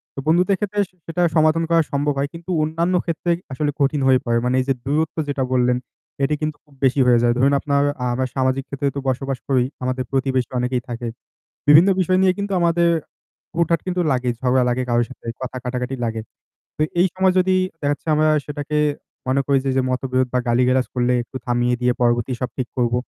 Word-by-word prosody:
তো -, -, -5 dB
বন্ধুদের 180 Hz, +4 st, +3 dB
ক্ষেত্রে 210 Hz, 0 st, -2 dB, 0.3 s
সেটা 170 Hz, +2 st, -2 dB
সমাধান 155 Hz, +1 st, +3 dB
করা 165 Hz, -1 st, +4 dB
সম্ভব 145 Hz, +1 st, 0 dB
হয়। 140 Hz, +1 st, -1 dB
কিন্তু 170 Hz, +2 st, -7 dB
অন্যান্য 165 Hz, +4 st, 0 dB
ক্ষেত্রে 170 Hz, +1 st, -1 dB, 0.2 s
আসলে 145 Hz, +3 st, -1 dB
কঠিন 140 Hz, +1 st, +1 dB
হয়ে 130 Hz, -1 st, +5 dB
পড়ে। 115 Hz, 0 st, +1 dB
মানে 125 Hz, +1 st, +1 dB
এই -, -, -4 dB
যে 135 Hz, -, +4 dB
দূরত্ব 155 Hz, +4 st, -1 dB
যেটা 135 Hz, -2 st, -1 dB
বললেন 125 Hz, -1 st, +2 dB, 0.5 s
এটি 150 Hz, +2 st, +2 dB
কিন্তু 155 Hz, -1 st, -2 dB
খুব 145 Hz, -, -23 dB
বেশি 135 Hz, +2 st, +2 dB
হয়ে 120 Hz, -1 st, +5 dB
যায়। 120 Hz, -, +3 dB
ধরুন 135 Hz, +3 st, +3 dB
আপনার 140 Hz, -1 st, +1 dB, 0.3 s
আমরা 130 Hz, +1 st, 0 dB
সামাজিক 130 Hz, 0 st, +1 dB
ক্ষেত্রে 140 Hz, 0 st, -2 dB
তো -, -, -1 dB
বসবাস 135 Hz, +1 st, -2 dB
করি 130 Hz, -3 st, +3 dB, 0.2 s
আমাদের 130 Hz, 0 st, -1 dB
প্রতিবেশী 130 Hz, -2 st, 0 dB
অনেকেই 125 Hz, 0 st, -1 dB
থাকে। 120 Hz, 0 st, -4 dB, 0.6 s
বিভিন্ন 160 Hz, +6 st, +7 dB
বিষয় 185 Hz, 0 st, +2 dB
নিয়ে 190 Hz, -1 st, +4 dB
কিন্তু 200 Hz, 0 st, -3 dB
আমাদের 170 Hz, 0 st, +3 dB, 0.7 s
হুটহাট 170 Hz, -1 st, +2 dB
কিন্তু 180 Hz, 0 st, 0 dB
লাগে 125 Hz, -1 st, 0 dB
ঝগড়া 130 Hz, 0 st, +2 dB
লাগে 125 Hz, +1 st, 0 dB
কারো 120 Hz, 0 st, +3 dB
সাথে 130 Hz, -, -14 dB, 0.2 s
কথা 130 Hz, 0 st, -5 dB
কাটাকাটি 125 Hz, +1 st, -3 dB
লাগে। 115 Hz, -1 st, -3 dB, 0.6 s
তো -, -, -3 dB, 0.2 s
এই 185 Hz, -, +5 dB
সময় 185 Hz, 0 st, +2 dB
যদি 185 Hz, 0 st, +2 dB, 0.3 s
দেখা 145 Hz, -, 0 dB
যাচ্ছে 145 Hz, -, -12 dB
আমরা 155 Hz, +1 st, +3 dB, 0.2 s
সেটাকে 150 Hz, +1 st, -3 dB, 0.5 s
মনে 135 Hz, +1 st, +2 dB
করি 140 Hz, -1 st, +3 dB
যে -, -, +1 dB
যে -, -, +4 dB
মতবিরোধ 130 Hz, 0 st, 0 dB
বা 125 Hz, -, +2 dB
গালি-গালাজ 125 Hz, +2 st, +2 dB
করলে 125 Hz, 0 st, +1 dB
একটু 130 Hz, -, -8 dB
থামিয়ে 120 Hz, 0 st, +1 dB
দিয়ে 125 Hz, 0 st, +3 dB
পরবর্তী 120 Hz, +1 st, +2 dB
সব 125 Hz, -, -1 dB
ঠিক 130 Hz, -2 st, -2 dB
করব। 120 Hz, -1 st, +1 dB
135 Hz, 200 wpm, -21 LUFS, 125-160 Hz, 0.7 s, বিভিন্ন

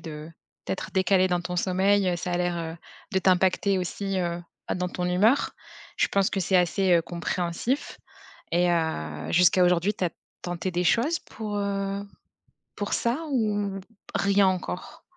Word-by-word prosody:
de 155 Hz, -1 st, -8 dB, 0.4 s
d'être 190 Hz, -, -3 dB
décalé 190 Hz, -1 st, +3 dB
dans 180 Hz, -1 st, +1 dB
ton 180 Hz, +1 st, -4 dB
sommeil, 190 Hz, +2 st, +2 dB
heu, 180 Hz, -, +1 dB
ça 180 Hz, +1 st, -4 dB
a -, -, +1 dB
l'air, 175 Hz, 0 st, 0 dB
heu, 165 Hz, 0 st, -5 dB, 0.4 s
de 190 Hz, -, +3 dB
t'impacter 190 Hz, +1 st, +3 dB
aussi, 195 Hz, +2 st, -2 dB
heu, 170 Hz, -1 st, -2 dB, 0.3 s
bah, -, -, 0 dB
dans 180 Hz, 0 st, -1 dB
ton 180 Hz, 0 st, -2 dB
humeur. 205 Hz, +9 st, +3 dB, 0.5 s
Je -, -, +3 dB
pense 195 Hz, -1 st, +2 dB
que -, -, -2 dB
c'est 185 Hz, +1 st, +2 dB
assez, 180 Hz, +1 st, +2 dB
heu, 170 Hz, -, +5 dB
compréhensif 175 Hz, -, -2 dB, 0.5 s
et 175 Hz, +1 st, +3 dB
heu, 80 Hz, -, -2 dB
jusqu'à 180 Hz, +2 st, +5 dB
aujourd'hui 180 Hz, +3 st, +2 dB
tu 195 Hz, -, -4 dB
as -, -, 0 dB, 0.3 s
tenté 175 Hz, +1 st, -3 dB
des 175 Hz, 0 st, 0 dB
choses 280 Hz, -, +2 dB
pour, 210 Hz, -2 st, -6 dB
heu, 200 Hz, 0 st, -2 dB, 0.8 s
pour 205 Hz, -, -2 dB
ça 235 Hz, +4 st, 0 dB
ou 205 Hz, -5 st, 0 dB
p 185 Hz, -, -18 dB, 0.3 s
rien 200 Hz, 0 st, +3 dB
encore? 185 Hz, +5 st, -3 dB
185 Hz, 170 wpm, -26 LUFS, 175-200 Hz, 0.8 s, heu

